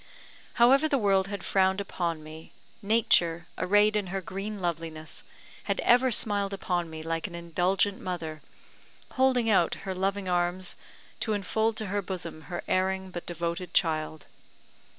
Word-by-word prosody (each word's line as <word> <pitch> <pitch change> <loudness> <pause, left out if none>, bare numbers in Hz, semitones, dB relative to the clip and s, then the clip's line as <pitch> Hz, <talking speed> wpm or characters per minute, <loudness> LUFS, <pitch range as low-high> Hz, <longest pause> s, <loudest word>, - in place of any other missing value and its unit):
However 270 +6 +5
the 280 - +2
world 195 -4 +2
had 200 -1 -5
frowned 190 0 +2
upon 170 -5 -3
me, 155 +1 -11 0.3
Nature, 180 -6 +3
arrayed 205 +3 +3
in 205 -3 0
her 195 +2 -3
green 195 +3 -5
loveliness, 165 -3 -5 0.4
had - - -1
ever 250 +2 +5
smiled 205 -3 +2
upon 175 -3 -2
me 160 0 -7
like 165 +3 -2
an 175 - -9
indulgent 180 +4 0
mother, 160 -4 -5 0.7
holding 255 -3 +2
out 190 -6 +3
her 190 - -2
loving 195 +1 -1
arms 180 +1 0 0.4
to 220 - 0
enfold 220 +2 0
to 215 - -2
her 200 +1 -1
bosom 170 -5 -5
her 175 -1 -4
erring 190 0 0
but 175 -1 -7
devoted 170 +1 -4
child. 155 -3 +1
190 Hz, 150 wpm, -28 LUFS, 170-205 Hz, 0.7 s, However